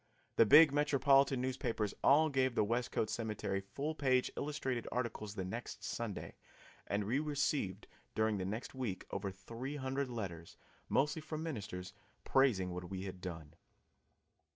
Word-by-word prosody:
The 115 - +6
big 150 +3 +9
metropolitan 140 -2 +4
newspapers 125 -5 -1
all 155 +3 +6
gave 130 -3 +1
the - - +4
Westcote 115 -1 0
Cemetery 105 -3 -2
full 140 +10 -4
page 130 -4 +2
illustrated 130 -5 -2
articles 115 -4 -3
the 95 -3 -3
next 115 +6 -6
Sunday, 115 -4 -4 0.5
and 100 +1 0
we 120 +7 +1
received 145 -8 -1 0.3
during 110 -2 +2
the 95 - -2
next 105 +5 -4
week 125 -8 -3
over 100 0 -2
three 115 +9 -6
hundred 135 -1 -2
letters, 95 -9 -6 0.3
mostly 150 +3 +2
from 155 0 -5
ministers, 100 - -5 0.3
praising 110 -10 +3
what 90 0 -6
we 95 -1 -4
had 95 -2 -7
done. 80 -5 -7
120 Hz, 145 wpm, -35 LUFS, 100-140 Hz, 0.5 s, big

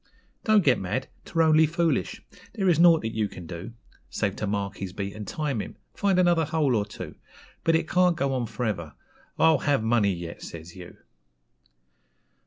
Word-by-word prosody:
Don't 215 -2 +5
get 130 -5 +4
mad; 105 +8 -3 0.2
'twere 165 - +1
only 160 0 +5
foolish; 160 - -1 0.3
there 195 -4 0
is 170 -3 +4
nought 170 -1 +6
that 110 0 -4
you 110 -1 0
can 90 - -10
do, 85 +6 -7 0.4
Save 100 -1 -1
to 105 - -2
mark 100 -1 -2
his 95 -2 -6
beat 100 0 -4
and 105 -1 -8
time 145 -8 -2
him - - -8 0.2
find 200 -2 +1
another 175 -3 +3
hole 155 -3 +1
or 105 -1 0
two; - - -8 0.5
But 165 - +3
it 160 -1 0
can't 180 -1 +3
go 140 -1 0
on 125 -3 -1
for 115 +2 -4
ever 85 -8 -3 0.4
'I'll 160 -3 +5
have 140 -5 +1
money 110 -3 +3
yet!' 85 -2 -6
says 85 +1 -9
you. 90 -2 -11
125 Hz, 190 wpm, -26 LUFS, 100-160 Hz, 0.5 s, nought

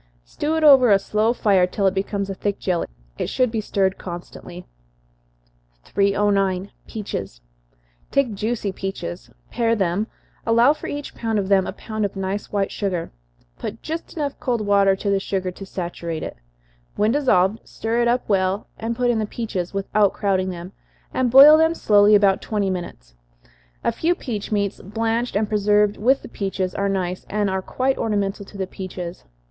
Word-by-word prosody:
Stew 300 - -2
it 320 - 0
over 270 -5 +8
a 200 - +7
slow 215 +3 +1
fire 195 -6 +3
till 195 +2 -2
it 190 - +3
becomes 200 +1 -2
a 195 - -3
thick 200 +1 -2
jelly. 180 -3 -1 0.3
It - - -1
should 255 -3 +1
be 225 -1 -1
stirred 195 -2 0
constantly. 175 0 -8 1.2
309. 200 - +1 0.2
Peaches. 100 - -6 0.7
Take 275 -5 +1
juicy 215 0 -2
peaches 190 -2 -6 0.2
pare 230 -1 +1
them, 195 +1 0 0.4
allow 235 +5 +5
for - - -8
each 290 0 -5
pound 225 -2 -2
of 195 -1 -1
them, 195 -2 +3
a - - -2
pound 215 +2 -5
of 200 -1 -2
nice 195 +1 -3
white 200 -1 0
sugar. 185 -5 -3 0.5
Put - - -6
just 325 +1 -5 0.2
cold 240 -3 -1
water 200 -1 +4
enough 190 - -6
to 200 - 0
the 195 - +2
sugar 190 -2 -2
to 195 +2 -10
saturate 170 -3 -5
it. - - -6 0.6
When 210 +2 +2
dissolved, 220 -7 +2
stir 230 +2 -1
it 240 - +2
up 245 +1 +1
well, 195 0 +1
and 230 +1 -2
put 245 0 +2
in 230 - 0
the 215 - -1
peaches, 205 -6 -4
without 200 +1 +1
crowding 190 -2 0
them, 175 0 -7 0.4
and 255 -1 +1
boil 285 +5 +9
them 320 +1 +3
slowly 210 -4 +5
about 200 -2 +4
twenty 205 -3 -1
minutes. - - -7 0.7
A - - +2
few 345 +2 0
peach 220 - -5
meats, 200 -2 -1
blanched 225 +4 -2
and 210 +1 +1
preserved 210 0 +2
with 260 +6 +2
the - - -8
peaches, 190 -4 -3
are 200 0 -1
nice, 185 -2 -2
and 205 -1 0
are 190 0 -1
quite 260 +7 -1
ornamental 205 -2 -1
to 200 - -12
the 190 - -1
peaches. 185 -2 -7
200 Hz, 175 wpm, -22 LUFS, 190-225 Hz, 1.2 s, boil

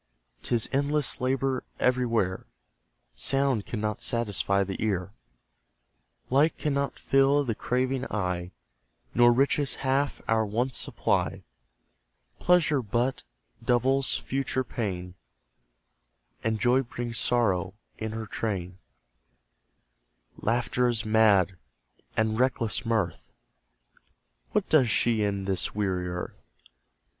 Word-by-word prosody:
'Tis 120 -3 +1
endless 145 0 +1
labour 130 0 0 0.2
everywhere! 115 -7 +1 0.7
Sound 130 - +1
cannot 110 -1 -3
satisfy 100 -4 +2
the 95 +2 -4
ear, 100 -2 -1 1.2
Light 145 +5 +3
cannot 140 -2 -1
fill 135 +1 +3
the 120 -4 -1
craving 130 +3 -1
eye, 90 -3 -2 0.6
Nor 120 0 +6
riches 140 +2 +1
half 135 +2 +1
our 110 0 +3
wants 115 +5 -1
supply, - - -1 1.0
Pleasure 165 -6 +3
but 120 +4 -1 0.4
doubles 130 +2 +2
future 130 -1 -2
pain, 90 -7 -4 1.3
And 110 -1 0
joy 125 +3 +3
brings 120 -2 -4
sorrow 100 -6 +1 0.2
in 110 0 -3
her 110 0 -4
train; 95 -5 -4 1.6
Laughter 120 +2 0
is 115 -2 -1
mad, 105 -4 +4 0.6
and 110 0 +1
reckless 120 -3 0
mirth 105 -8 -1 1.2
What - - 0
does 135 -7 +4
she 115 0 +2
in 100 -2 -1
this 95 0 -1
weary 95 -3 -1
earth? 90 0 -6
115 Hz, 100 wpm, -27 LUFS, 100-130 Hz, 1.6 s, Nor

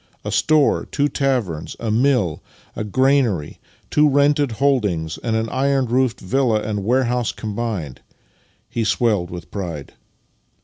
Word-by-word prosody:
A - - -3
store, 155 -3 +2
two 145 0 0
taverns, 120 - -1
a 115 -2 -2
mill, 120 - +1 0.3
a - - -3
granary, 120 - +1 0.3
two 150 0 +4
rented 145 -2 +2
holdings, 105 - 0
and 115 -2 -2
an 110 0 0
iron 135 0 +1
roofed 125 0 +1
villa 120 +1 +1
and 105 -1 -3
warehouse 125 0 +1
combined." 105 - -4 0.7
He 115 - -2
swelled 105 -5 +1
with 90 -1 -9
pride. 85 -8 -6
115 Hz, 130 wpm, -20 LUFS, 100-135 Hz, 0.7 s, two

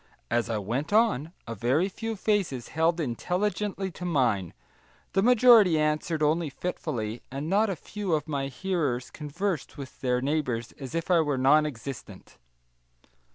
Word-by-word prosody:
As 120 0 +1
I 110 - 0
went 120 - -3
on, 210 - +2
a 115 - -5
very 125 - +1
few 225 +3 -5
faces 195 - -1
held 165 +2 +1
intelligently 190 - -2
to 180 - -10
mine; 125 - 0 0.6
the 195 - +3
majority 230 -6 +6
answered 155 +1 0
only 155 +1 +2
fitfully; 120 -8 -4
and 140 +3 -5
not 205 +5 +2
a 195 - -1
few 200 +3 -4
of 155 0 0
my 140 -3 -2
hearers 140 -5 -2
conversed 160 +3 -4
with 135 -2 -9
their 125 -1 +1
neighbours 130 -4 -1
as 135 +2 -7
if 165 +3 -2
I 175 - +6
were 145 -3 0
non 150 +4 +4
existent. 135 - -9
155 Hz, 155 wpm, -27 LUFS, 130-185 Hz, 0.6 s, majority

